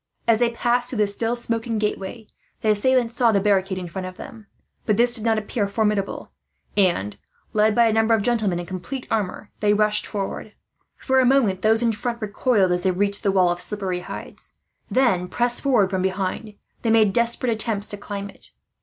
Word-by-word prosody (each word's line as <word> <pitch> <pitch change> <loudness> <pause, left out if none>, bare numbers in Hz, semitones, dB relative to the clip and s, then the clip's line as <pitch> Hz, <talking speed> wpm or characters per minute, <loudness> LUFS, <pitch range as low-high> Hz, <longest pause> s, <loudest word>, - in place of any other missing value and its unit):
As 225 -1 +4
they 240 -1 +3
passed 240 +1 0
through 250 - -1
the 210 - +3
still 225 +4 +1
smoking 230 -1 -2
gateway 210 +1 -3 0.4
the 215 - +2
assailants 240 +2 +1
saw 235 -2 +3
the 200 - +2
barricade 195 -1 +1
in 180 -1 -5
front 185 +2 -6
of 185 - -10
them, 220 -3 -11 0.4
but 210 - +2
this 240 +1 +5
did 220 - +2
not 225 -1 +2
appear 210 0 -2
formidable 205 -1 -2 0.4
and, 170 - +1 0.3
led 215 0 +3
by 235 - +5
a 225 - +2
number 225 +1 +3
of 210 - -1
gentlemen 215 -7 +1
in 175 - -5
complete 190 +9 -6
armour, 205 -1 -3
they 210 0 +2
rushed 210 0 +2
forward. 205 +1 -5 0.4
For 265 -1 +1
a - - +4
moment 240 -8 +2
those 220 +2 +4
in 230 - +2
front 235 +2 -4
recoiled, 210 -2 +1
as 180 0 0
they 190 - +1
reached 200 +2 0
the 200 - +1
wall 185 -2 +3
of 175 0 -3
slippery 190 -2 -3
hides; - - -9 0.3
then, 195 -9 +2
pressed 240 +4 0
forward 230 -9 +2
from 190 -1 -1
behind, 190 +3 -3 0.3
they 230 - -1
made 220 -3 +4
desperate 235 +1 +1
attempts 220 -2 -1
to - - -5
climb 200 0 -6
it. - - -14
210 Hz, 200 wpm, -22 LUFS, 195-235 Hz, 0.4 s, this